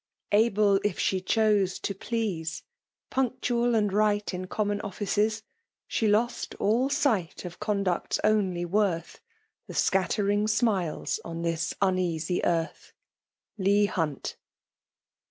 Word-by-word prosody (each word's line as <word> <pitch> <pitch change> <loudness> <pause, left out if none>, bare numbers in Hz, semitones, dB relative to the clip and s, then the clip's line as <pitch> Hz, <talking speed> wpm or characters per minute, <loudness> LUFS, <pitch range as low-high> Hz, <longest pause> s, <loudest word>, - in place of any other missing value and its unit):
Able, 210 -2 +4
if 205 -3 0
iHe 185 -1 0
chote, 210 -4 +3
to 200 - -1
please, 195 -6 -3
^ - - -36 0.2
' - - -67
' - - -66
'Punctual 245 -2 +1
and 210 -3 +1
right 210 -1 +1
in 185 0 -4
common 205 +1 -1
offices/ 210 +2 -1 0.2
' 465 - -53
' - - -32
8he 220 - +2
loit 225 +4 0
all 235 +6 +2 0.2
light 190 - 0
of 175 -1 -8
conduct's 200 -4 -1
only 195 -5 +2
worth,^ 175 -3 0 0.5
.The - - -8
scattering 200 +3 +1
smiles 210 -7 0
on 165 0 -5
this 165 -1 -1
uneasy 180 -2 0
earth. 165 0 -1 0.3
' - - -37
Lbior 200 +2 +3
Hin«T. 155 -6 -2
205 Hz, 135 wpm, -27 LUFS, 180-215 Hz, 0.5 s, Able